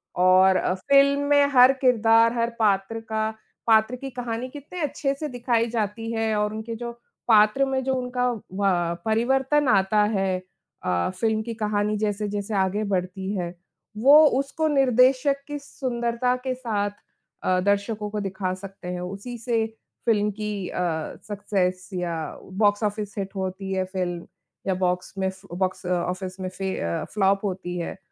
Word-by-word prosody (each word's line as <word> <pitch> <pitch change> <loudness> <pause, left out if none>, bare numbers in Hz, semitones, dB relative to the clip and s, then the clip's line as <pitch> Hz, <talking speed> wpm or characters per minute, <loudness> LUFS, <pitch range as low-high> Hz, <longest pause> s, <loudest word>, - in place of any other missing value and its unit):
और 185 +1 +5
अ, 180 - 0
फ़िल्म 280 +7 +4
में 285 0 +6
हर 255 +1 +8
किरदार, 230 -2 +5
हर 230 0 +1
पात्र 205 +1 +1
का 220 -1 -2 0.4
पात्र 220 +2 +4
की 270 +2 -7
कहानी 245 0 -4
कितने 295 +6 -8
अच्छे 280 -1 -1
से 305 - -2
दिखाई 235 -2 0
जाती 225 0 -2
है 225 -1 0
और 210 0 0
उनके 220 +1 -5
जो 235 +1 -5 0.4
पात्र 215 +4 +5
में 265 -1 -1
जो 265 0 0
उनका 250 0 0
व 185 -5 -1
परिवर्तन 265 +6 +2
आता 200 +1 +4
है। 190 -1 +1 0.5
अ, 90 - 0
फ़िल्म 220 -1 +1
की 230 0 -5
कहानी 210 -1 0
जैसे-जैसे 205 0 -2
आगे 195 +2 +1
बढ़ती 190 +2 -2
है, 175 -1 -3 0.4
वो 290 +7 +8
उसको 300 +3 -1
निर्देशक 270 0 +3
की 290 0 -4
सुंदरता 250 -2 -1
के 260 - 0
साथ 210 -5 -2 0.5
अ, 185 0 +2
दर्शकों 205 +2 0
को 210 0 -3
दिखा 190 -2 -2
सकते 195 -1 -10
हैं 180 - -4
उसी 200 +7 -6
से, 230 -1 0 0.4
फ़िल्म 210 -2 +2
की 205 -3 -3
अ, - - -4 0.5
सक्सेस 190 -3 -1
या 175 -2 -2 0.5
बॉक्स 205 +1 +3
ऑफिस 210 0 -2
हिट 195 0 -4
होती 190 0 -4
है 190 0 +1
फ़िल्म, 180 -2 -4 0.4
या 190 - +2
बॉक्स 180 0 -1
में 190 0 0 0.2
बॉक्स 185 0 -2
ऑफिस 180 +1 -2
में 185 0 -3
फे 190 +1 -4
अ, 85 0 -2
फ्लॉप 195 0 +2
होती 180 -2 -3
है, 170 - -5
210 Hz, 160 wpm, -24 LUFS, 190-245 Hz, 0.5 s, हर